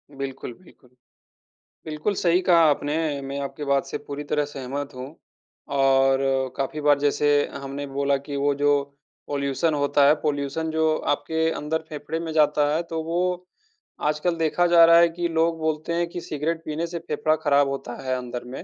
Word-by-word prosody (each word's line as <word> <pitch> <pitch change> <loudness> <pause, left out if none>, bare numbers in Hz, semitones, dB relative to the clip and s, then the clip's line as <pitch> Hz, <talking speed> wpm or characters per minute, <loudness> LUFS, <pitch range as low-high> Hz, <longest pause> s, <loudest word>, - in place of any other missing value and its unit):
बिल्कुल, 135 -2 -6
बिल्कुल। 135 -7 -21 1.0
बिल्कुल, 155 +6 -2
सही 175 0 +2
कहा 180 -2 +4
आपने। 145 +1 0 0.3
मैं 135 +1 -5
आपकी 140 +2 -6
बात 140 -1 +1
से - - -4
पूरी 145 +1 -7
तरह 150 0 0
सहमत 140 0 -6
हूँ। 130 +4 -8 0.6
और 135 -1 +4 0.4
काफ़ी 140 +3 -3
बार 145 -1 +4
जैसे 145 +1 +1 0.3
हमने 140 +1 -6
बोला 140 0 0
कि 140 +1 -7
वो 140 +1 +1
जो 145 +1 +2 0.6
पॉल्यूशन 140 +3 0
होता 145 -1 +3
है, 145 - +7
पॉल्यूशन 145 +2 -2
जो 160 0 +2 0.2
आपके 160 +2 -1
अंदर 160 +1 -2
फेफड़े 150 +1 -5
में 165 -1 -5
जाता 150 -1 +3
है। 165 - +1
तो 165 -1 -4
वो, 180 +2 -1 0.6
आजकल 150 +3 0
देखा 165 +2 +2
जा 170 -1 +7
रहा 170 0 +7
है 170 0 +5
कि 170 +1 -2
लोग 165 0 +1
बोलते 155 +1 -2
हैं 170 0 0
कि 175 - -6
सिगरेट 160 +2 -3
पीने 160 +2 -3
से 170 0 -5
फेफड़ा 155 -1 0
ख़राब 145 -1 +4
होता 135 -3 -5
है 130 -1 -1
अंदर 125 -1 -6
में - - -6
150 Hz, 175 wpm, -24 LUFS, 140-165 Hz, 1.0 s, है